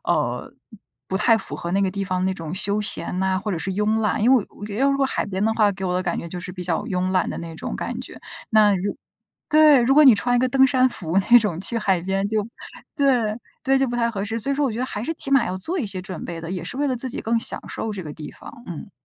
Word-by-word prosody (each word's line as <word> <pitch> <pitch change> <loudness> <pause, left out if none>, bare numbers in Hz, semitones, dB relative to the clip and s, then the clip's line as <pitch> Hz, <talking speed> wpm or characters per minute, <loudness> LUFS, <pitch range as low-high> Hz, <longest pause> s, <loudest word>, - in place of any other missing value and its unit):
呃， - - -1 0.5
不 190 - -2
太 225 +3 +4
符 - - -7
合 170 - -5
那 195 - +2
个 190 - +1
地 200 +1 -3
方 185 -1 -1
那 190 - +1
种 165 -2 -6
休 205 +2 +1
闲 200 -3 -2
呐， 190 0 +1
或 210 - -2
者 175 - -2
是 190 - -3
慵 210 +3 +1
懒， 210 -1 0
因 245 +4 +5
为 235 -6 +3
我 205 - -10
要 270 +6 +2
如 275 - +1
果 275 -1 +2
海 - - -2
边 190 0 -2
的 220 - +2
话， 210 -2 +4
给 190 0 -6
我 180 -1 -1
的 180 - 0
感 175 -2 -2
觉 170 - -5
就 180 +1 -6
是 185 +1 -7
比 180 0 -6
较 170 -2 -1
慵 185 0 -1
懒 185 -1 +1
的 - - -5
那 165 -1 -7
种 - - -5
感 - - -4
觉， - - -9 0.3
那 215 -2 +5
如 195 +2 -2 0.5
对， 305 -3 +7
如 260 +3 +3
果 305 +1 +7
你 260 -5 +9
穿 245 +4 +1
一 - - +3
个 255 - +3
登 265 +1 +4
山 255 -1 +3
服 170 -4 -1
那 240 - +10
种 210 -8 -2
去 230 +5 -1
海 190 -5 +1
边 195 +2 -1
就 215 -1 -1 0.5
对， 250 -7 +2 0.3
对， 270 0 +3
就 270 -1 +1
不 240 - -3
太 235 -1 +1
合 200 -4 -4
适， 225 +3 -3
所 275 +5 -1
以 - - 0
说 290 - -1
我 255 - -1
觉 220 - -5
得 250 - 0
还 210 -5 -5
是 325 +7 -3
起 280 - -4
码 275 -4 +4
要 185 - -3
做 335 - -3
一 265 - -1
些 190 -2 -5
准 185 -3 -7
备 170 -1 -6
的， 165 +1 -6
也 180 -2 -4
是 175 - -6
为 290 +1 0
了 260 - 0
自 250 +2 -5
己 - - -6
更 230 +1 +1
享 - - -3
受 220 - -4
这 200 -3 -5
个 150 -3 -7
地 150 0 -8
方。 - - -12
嗯。 175 +4 -7
210 Hz, 320 characters per minute, -23 LUFS, 185-245 Hz, 0.5 s, 那